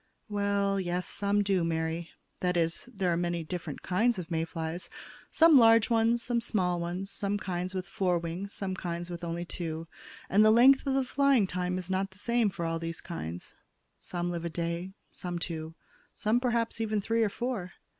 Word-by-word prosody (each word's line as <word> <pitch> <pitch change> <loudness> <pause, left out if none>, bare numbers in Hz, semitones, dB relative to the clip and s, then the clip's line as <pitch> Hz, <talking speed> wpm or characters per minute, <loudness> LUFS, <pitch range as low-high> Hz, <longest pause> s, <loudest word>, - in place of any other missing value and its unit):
"Well, 200 -1 +1
yes, 180 -1 -1
some 205 0 +1
do, 195 -3 +2
Mary. 165 0 -1 0.3
That 180 -1 +1
is, 165 +7 -1
there 190 -6 0
are - - +1
many 175 -1 -1
different 165 -2 -6
kinds 225 +5 +2
of 175 -2 -6
May 165 0 0
flies; 165 +1 -5 0.4
some 325 -4 +7
large 225 0 +6
ones, 230 +1 +3
some 240 -1 0
small 180 -6 0
ones, 180 +3 -4
some 200 0 -1
kinds 185 -1 -3
with 185 -1 -2
four 185 -2 0
wings, 170 +4 -4
some 195 -2 -2
kinds 175 -1 -4
with 175 0 -6
only 170 +1 -3
two, 165 -2 -5 0.4
and 205 +2 +5
the 215 - +7
length 260 +5 +6
of 270 - +2
the 270 - +3
flying 270 -4 +3
time 180 0 -2
is 185 0 -5
not 190 +1 0
the 190 - -18
same 235 0 +2
for 170 -3 -4
all 165 0 -1
these 165 0 -4
kinds. 85 - -6 0.5
Some 175 0 -3
live 170 -1 -4
a 170 - -2
day, 170 +3 -3 0.2
some 175 -2 -5
two, 160 -2 -5 0.4
some 220 +3 +2
perhaps 235 -2 0
even 215 -1 0
three 225 +3 0
or 220 - +3
four. 215 -6 -3
185 Hz, 195 wpm, -30 LUFS, 170-215 Hz, 0.5 s, some